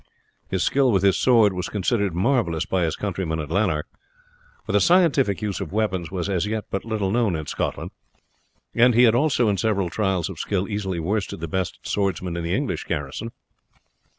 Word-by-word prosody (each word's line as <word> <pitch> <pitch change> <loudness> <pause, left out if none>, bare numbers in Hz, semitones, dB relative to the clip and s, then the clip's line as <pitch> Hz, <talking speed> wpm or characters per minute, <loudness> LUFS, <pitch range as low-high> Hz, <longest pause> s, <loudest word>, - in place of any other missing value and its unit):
His 95 -2 0
skill 135 -2 +3
with 95 -3 +2
his 100 -2 +4
sword 115 -6 +4
was 90 -1 -4
considered 100 -2 0
marvellous 95 - +1
by 90 -2 0
his 80 - -1
countrymen 90 -5 -3
at 75 0 -5
Lanark, 90 -5 +1 0.8
for - - -3
the - - +3
scientific 145 - +3
use 100 -2 -2
of 90 - -5
weapons 95 -5 -1
was 90 -2 -3
as 95 -1 0
yet 110 0 -2
but 100 - -2
little 110 -4 -2
known 115 -5 +1
in 80 -1 -4
Scotland, - - -3 0.8
and 120 0 +4
he 120 - +6
had 115 -3 +6
also 125 -2 +2
in 100 -2 +1
several 100 -6 0
trials 95 -5 0
of 95 -5 -8
skill 100 -1 -1
easily 100 -4 -3
worsted 95 +2 -2
the 85 - -4
best 90 +1 -2
swordsmen 95 -3 -1
in 85 - -3
the 85 - 0
English - - -2
garrison. 75 +10 -4
100 Hz, 190 wpm, -23 LUFS, 90-110 Hz, 0.8 s, he